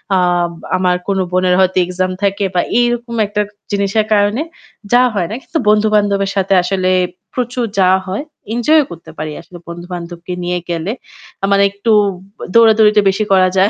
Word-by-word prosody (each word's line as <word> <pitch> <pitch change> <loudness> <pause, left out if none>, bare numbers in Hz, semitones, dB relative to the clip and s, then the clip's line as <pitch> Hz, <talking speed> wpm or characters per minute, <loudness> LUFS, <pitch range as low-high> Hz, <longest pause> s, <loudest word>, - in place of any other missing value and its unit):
আ - - +3 0.6
আমার 180 -1 +1
কোন 195 -1 0
বোনের 185 0 +2
হয়তো 185 0 +2
এক্সাম 185 +1 -2
থাকে 200 0 +1
বা 175 - +3 0.2
এরকম 240 0 -1
একটা 210 +1 -1 0.3
জিনিসের 200 +2 +1
কারণে 205 +5 +2 0.5
যাওয়া 250 +1 +5
হয় 180 -4 0
না। 220 - -4
কিন্তু 320 - -3
বন্ধু-বান্ধবের 205 -2 +2
সাথে 195 0 +1
আসলে 185 0 0 0.4
প্রচুর 245 -1 -2
যাওয়া 190 0 +4
হয়। 195 +8 -3 0.3
এনজয় 300 +6 +3
করতে 170 -1 -11
পারি 155 0 -4
আসলে 175 +1 -13
বন্ধু-বান্ধবকে 175 0 -7
নিয়ে 180 0 -1
গেলে। 170 +3 -2 0.5
আ - - +4
মানে 200 0 +4
একটু 200 +3 -1 0.6
দৌড়াদৌড়িটা 220 -2 +5
বেশি 195 +3 0
করা 185 -1 +5
যায়। 195 +2 +4
195 Hz, 160 wpm, -16 LUFS, 185-215 Hz, 0.6 s, যাওয়া